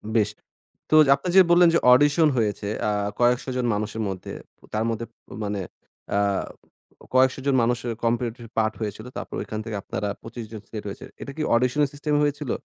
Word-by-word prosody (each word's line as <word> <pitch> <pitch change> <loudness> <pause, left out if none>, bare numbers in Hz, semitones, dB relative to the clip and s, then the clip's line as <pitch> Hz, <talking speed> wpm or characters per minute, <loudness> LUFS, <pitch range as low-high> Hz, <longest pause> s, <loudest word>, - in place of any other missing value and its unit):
বেশ 105 -2 +3 0.6
তো - - +1
যে - - +3
আপনে 180 - -6
যে - - +11
বললেন 175 0 +7
যে - - +5
অডিশন 145 +4 +5
হয়েছে 105 -3 -1 0.2
আ - - +2 0.3
কয়েকশো 125 +2 +2
জন 125 - 0
মানুষের 110 +2 -3
মধ্যে 95 -2 -6 0.4
তার 110 +1 +1
মধ্যে 115 0 -3 0.4
মানে 100 0 -2 0.6
আ - - +3 1.0
কয়েকশো 130 +1 +4
জন 140 - +3
মানুষের 120 0 0
কম্পিটিটিভ 120 0 -1
পার্ট 110 -1 +2
হয়েছিল। 110 +1 -5
তারপর - - -6
ওইখান 110 - -5
থেকে 110 -2 -4
আপনারা 105 - -3
২৫ 115 0 -7
জন 110 - -6
সিলেক্ট 105 -2 -7
হয়েছেন। 100 - -8
এটা 140 - -6
কি 155 - -2
অডিশনের 125 +5 +2
সিস্টেম 150 +1 -2
হয়েছিল? 145 -2 -1
120 Hz, 175 wpm, -24 LUFS, 110-140 Hz, 1.0 s, যে